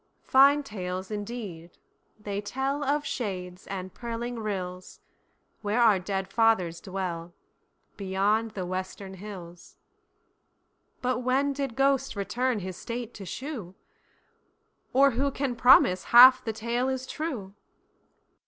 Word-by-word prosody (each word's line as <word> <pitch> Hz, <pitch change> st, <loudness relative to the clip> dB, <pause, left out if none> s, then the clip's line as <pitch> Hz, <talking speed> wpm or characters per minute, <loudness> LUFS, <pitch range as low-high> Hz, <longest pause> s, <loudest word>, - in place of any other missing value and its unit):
Fine 280 Hz, +2 st, +5 dB
tales 185 Hz, -5 st, -5 dB
indeed, 205 Hz, -6 st, -6 dB, 0.4 s
they 205 Hz, -1 st, -4 dB
tellOf 275 Hz, +6 st, -1 dB
shades 185 Hz, -5 st, -5 dB
and 185 Hz, -1 st, -6 dB
purling 235 Hz, +1 st, -5 dB
rills, 185 Hz, -4 st, -5 dB, 0.6 s
Where 210 Hz, +3 st, 0 dB
our 220 Hz, -5 st, +5 dB
dead 190 Hz, 0 st, -3 dB
fathers 205 Hz, -8 st, +2 dB
dwellBeyond 190 Hz, +3 st, -4 dB
the 185 Hz, -2 st, -3 dB
western 185 Hz, +1 st, -5 dB
hills, 180 Hz, -3 st, -10 dB, 1.3 s
But 250 Hz, 0 st, 0 dB
when 265 Hz, +3 st, +1 dB
did 275 Hz, -4 st, -4 dB
ghost 270 Hz, -1 st, +1 dB
return 220 Hz, +3 st, -1 dB
his 185 Hz, -1 st, -6 dB
state 240 Hz, 0 st, -6 dB
to 195 Hz, -3 st, -9 dB
shew; 235 Hz, -, -6 dB, 1.2 s
Or 275 Hz, +2 st, +5 dB
who 270 Hz, +4 st, 0 dB
can 270 Hz, -2 st, -2 dB
promise 230 Hz, -7 st, +5 dB
half 255 Hz, +2 st, +8 dB
the 225 Hz, -, -2 dB
tale 235 Hz, +4 st, -1 dB
is 260 Hz, -1 st, -3 dB
true? 260 Hz, -12 st, -5 dB
215 Hz, 115 wpm, -27 LUFS, 190-255 Hz, 1.3 s, half